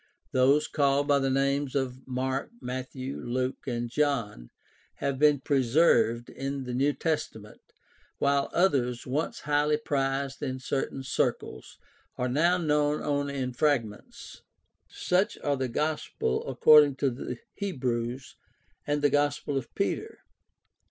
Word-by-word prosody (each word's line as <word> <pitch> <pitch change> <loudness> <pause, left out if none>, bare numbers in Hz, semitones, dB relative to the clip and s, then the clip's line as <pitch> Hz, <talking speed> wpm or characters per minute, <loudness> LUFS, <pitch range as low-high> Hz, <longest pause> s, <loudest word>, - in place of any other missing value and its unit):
Those 135 +4 +3
called 140 -1 +1
by 145 -1 +4
the 135 0 0
names 140 +1 0
of 130 -2 -3
Mark, 130 +1 -2
Matthew, 130 +1 -5
Luke, 125 +3 -3
and 120 -1 -2
John 115 - -1 0.5
have 140 -1 -2
been 150 -2 +4
preserved 130 -3 +3
in 135 0 -4
the 125 -1 -5
New 140 +4 +2
Testament, 125 -11 -4 0.6
while 140 0 +1
others 130 -9 +1
once 145 +5 -2
highly 150 +1 +2
prized 135 -2 -2
in 130 -2 -3
certain 135 +1 -3
circles - - -2 0.4
are 125 - -1
now 170 +7 +3
known 150 -3 +1
only 145 -1 -1
in 130 -1 -2
fragments. 120 -6 -2 0.5
Such 185 +3 0
are 145 -1 +1
the 130 -1 -2
Gospel 150 - -2
according 150 -3 +6
to 135 0 0
the 120 - -6 0.2
Hebrews 130 - -3 0.5
and 145 0 0
the 145 - +4
Gospel 145 0 0
of 130 -3 -3
Peter. 420 - -2
135 Hz, 130 wpm, -28 LUFS, 130-145 Hz, 0.6 s, according